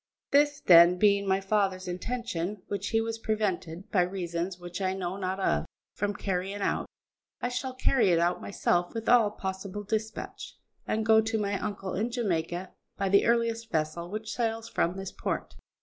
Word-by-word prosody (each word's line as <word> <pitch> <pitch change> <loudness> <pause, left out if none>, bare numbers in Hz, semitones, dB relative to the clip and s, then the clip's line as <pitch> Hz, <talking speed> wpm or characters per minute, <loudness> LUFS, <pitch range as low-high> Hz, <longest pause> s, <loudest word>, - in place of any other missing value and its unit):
This, 290 0 +4
then, 170 0 +8
being 200 0 +3
my 190 0 +3
father's 195 -2 0
intention, 190 -1 -3
which 200 0 -3
he 225 - +2
was 225 0 -2
prevented, 195 -5 -2
by 185 - +4
reasons 175 0 -2
which 175 +1 -7
I 190 0 0
know 185 -1 -3
not 190 0 -3
of, 190 - +1 0.3
from 205 0 -2
carrying 195 +1 -2
out, - - 0 0.5
I 245 - -1
shall 255 +1 -3
carry 255 -5 +3
it 170 - +4
out 175 +1 +1
myself 175 -1 0
with 225 0 -4
all 235 -3 +6
possible 190 0 -5
dispatch, 220 +1 -4 0.3
and 220 0 0
go 220 0 +6
to 220 +1 -1
my 200 -2 -1
uncle 200 -3 -4
in 220 +5 0
Jamaica 180 -6 -2 0.3
by 195 -1 0
the 200 +2 +4
earliest 230 -1 +1
vessel 160 +2 -1
which 215 +2 -5
sails 225 -1 -1
from 180 -4 0
this 195 -1 -5
port. - - -3
200 Hz, 175 wpm, -29 LUFS, 180-220 Hz, 0.5 s, then